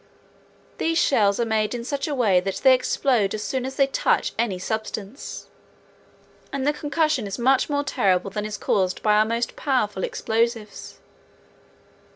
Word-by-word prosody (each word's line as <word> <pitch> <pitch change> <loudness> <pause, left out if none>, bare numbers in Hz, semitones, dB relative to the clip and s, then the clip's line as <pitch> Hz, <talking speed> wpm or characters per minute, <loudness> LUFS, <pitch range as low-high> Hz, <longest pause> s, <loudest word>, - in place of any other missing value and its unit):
These 330 0 0
shells 205 -10 +3
are 235 - +2
made 220 0 0
in 235 - -5
such 280 +4 -3
a 295 - -2
way 210 -8 +3
that 195 +1 -3
they 265 -1 +8
explode 250 -5 +1
as 210 - -4
soon 255 +5 -2
as 265 - -7
they 275 - +4
touch 270 - 0
any 220 -5 -1
substance, 220 +4 -5 1.1
and 275 -1 -2
the 295 - +2
concussion 300 -5 0
is 195 - -5
much 260 +4 +2
more 285 0 0
terrible 195 -7 +1
than 210 +1 -3
is 210 0 -4
caused 185 -2 0
by 210 - +4
our 210 +1 +4
most 230 +1 -2
powerful 215 -9 -1
explosives. 225 -2 -2
230 Hz, 165 wpm, -23 LUFS, 205-270 Hz, 1.1 s, they